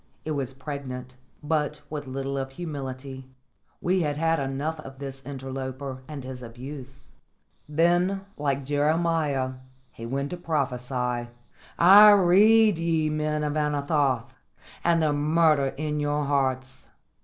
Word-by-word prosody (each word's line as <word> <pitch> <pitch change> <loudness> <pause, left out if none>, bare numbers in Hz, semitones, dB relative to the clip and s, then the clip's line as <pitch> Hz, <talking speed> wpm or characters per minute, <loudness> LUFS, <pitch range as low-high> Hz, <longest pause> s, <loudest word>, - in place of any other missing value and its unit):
It 155 - -3
was 135 -3 -2
pregnant, 130 -2 -7 0.3
but 150 -1 -1
with 145 -2 -5
little 135 +1 -3
of 135 -1 -4
humility. 135 -4 -6 0.5
We 185 +1 +1
had 145 -2 -1
had 165 +1 +1
enough 140 +4 -3
of 135 -3 -10
this 135 -1 -7
interloper 130 0 -6
and 150 -3 -7
his 130 -1 -7
abuse. 130 +3 -10 0.6
Then, 175 +5 +2
like 140 -1 -1
Jeremiah, 145 -1 +1 0.4
he 115 - -8
went 140 +3 -2
to 180 - -4
prophesy: 125 -6 -2 0.5
"I 200 +5 +9
read 205 +1 +5
ye, 160 -2 +1
men 150 0 -1
of 150 0 -1
Anathoth, 145 -4 0 0.5
and 170 -1 +3
the 150 -1 +2
murder 150 -1 +3
in 150 0 -2
your 145 0 0
hearts. 130 -2 -1
145 Hz, 130 wpm, -26 LUFS, 135-155 Hz, 0.6 s, I